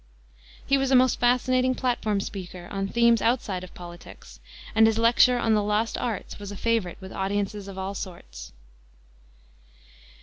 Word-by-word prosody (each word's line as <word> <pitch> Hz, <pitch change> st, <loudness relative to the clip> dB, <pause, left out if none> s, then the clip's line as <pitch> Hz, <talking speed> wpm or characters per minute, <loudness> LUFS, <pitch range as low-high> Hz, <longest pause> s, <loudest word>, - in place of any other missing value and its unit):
He 275 Hz, 0 st, +2 dB
was 270 Hz, -1 st, 0 dB
a 265 Hz, -, +4 dB
most 255 Hz, 0 st, +4 dB
fascinating 255 Hz, +1 st, +2 dB
platform 220 Hz, -6 st, -1 dB
speaker 180 Hz, -3 st, -7 dB
on 195 Hz, -1 st, -2 dB
themes 235 Hz, +2 st, +3 dB
outside 215 Hz, -6 st, 0 dB
of 185 Hz, -, -12 dB
politics, 175 Hz, -1 st, -12 dB, 0.3 s
and 220 Hz, 0 st, +6 dB
his 225 Hz, -1 st, +1 dB
lecture 235 Hz, +2 st, +4 dB
on 225 Hz, -2 st, +1 dB
the 210 Hz, -, +3 dB
Lost 210 Hz, +2 st, 0 dB
Arts 225 Hz, -4 st, -4 dB
was 205 Hz, -1 st, -7 dB
a 205 Hz, -, -7 dB
favorite 225 Hz, -6 st, -1 dB
with 190 Hz, 0 st, -10 dB
audiences 200 Hz, +1 st, -2 dB
of 195 Hz, -1 st, -9 dB
all 190 Hz, +1 st, -4 dB
sorts. 60 Hz, -, -8 dB
210 Hz, 160 wpm, -25 LUFS, 190-240 Hz, 0.3 s, and